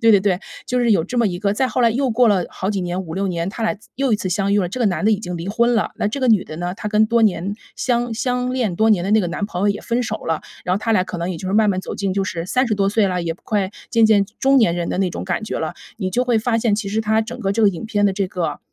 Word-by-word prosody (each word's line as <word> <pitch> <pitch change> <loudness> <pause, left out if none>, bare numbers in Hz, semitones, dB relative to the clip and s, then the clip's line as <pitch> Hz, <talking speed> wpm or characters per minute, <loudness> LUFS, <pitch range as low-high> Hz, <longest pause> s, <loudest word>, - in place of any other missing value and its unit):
对 230 - +6
对 205 - +7
对， 190 -1 +1 0.3
就 250 - 0
是 235 -2 +2
有 170 -6 +3
这 245 - -5
么 235 - +3
一 175 - -4
个 200 +1 0
再 260 +3 +1
后 250 - -1
来 230 -1 +5
又 260 +2 0
过 240 +2 +4
了 190 -4 +2
好 190 - -4
几 200 -3 -1
年， 180 +1 -2
5-6 190 +2 -3
年， 170 0 -2
他 225 +3 -6
俩 220 - 0 0.2
又 270 -2 0
一 - - +4
次 185 - -4
相 195 +2 0
遇 205 - +4
了， 180 - -1
这 250 +7 -5
个 230 - +3
男 195 +1 0
的 220 - +4
已 205 - 0
经 180 -4 -5
离 170 +2 -6
婚 235 +3 +2
了， 220 - 0
那 205 - 0
这 255 +7 -4
个 260 - +2
女 215 -5 +5
的 155 - -8
呢， 175 +2 -3
她 210 - -5
跟 215 +1 +3
多 230 0 +2
年 200 -1 +1 0.2
相 240 -2 0
相 250 +1 -1
恋 235 -8 0
多 220 +3 +3
年 180 -4 +3
的 200 - -1
那 220 - +5
个 175 - -1
男 200 +4 -3
朋 180 -3 -5
友 205 - +3
也 200 - -1
分 235 +1 -1
手 230 - -2
了， 160 -1 -1 0.2
然 180 - +1
后 - - -2
他 225 +1 -2
俩 185 -3 +3
可 180 - -6
能 170 +2 -2
也 175 - -4
就 185 - -6
是 195 - -1
慢 215 -1 +4
慢 185 -1 -1
走 - - -6
进 195 -2 -2
就 195 0 0
是 165 -3 -4
30 245 0 +1
多 195 -1 +1
岁 205 0 +2
了， 180 -2 -1
也 165 - -1
不 165 - -18
快 200 -3 0 0.2
渐 230 -2 +4
渐 210 -2 +5 0.2
中 270 0 +5
年 220 -8 +3
人 175 -1 -2
的 - - -2
那 190 - +2
种 - - -5
感 190 +4 -2
觉 - - -4
了。 - - -3 0.2
你 185 -3 -2
就 250 +6 +1
会 240 -2 +2
发 230 +1 0
现， 225 -2 +2
其 205 -1 -3
实 215 +3 0
它 220 0 +2
整 225 - -7
个 195 -2 0
这 225 +2 0
个 205 - +7
影 190 +3 -4
片 205 -2 +1
的 195 - +1
这 195 0 -1
个 165 -6 -3
205 Hz, 355 characters per minute, -20 LUFS, 185-225 Hz, 0.3 s, 对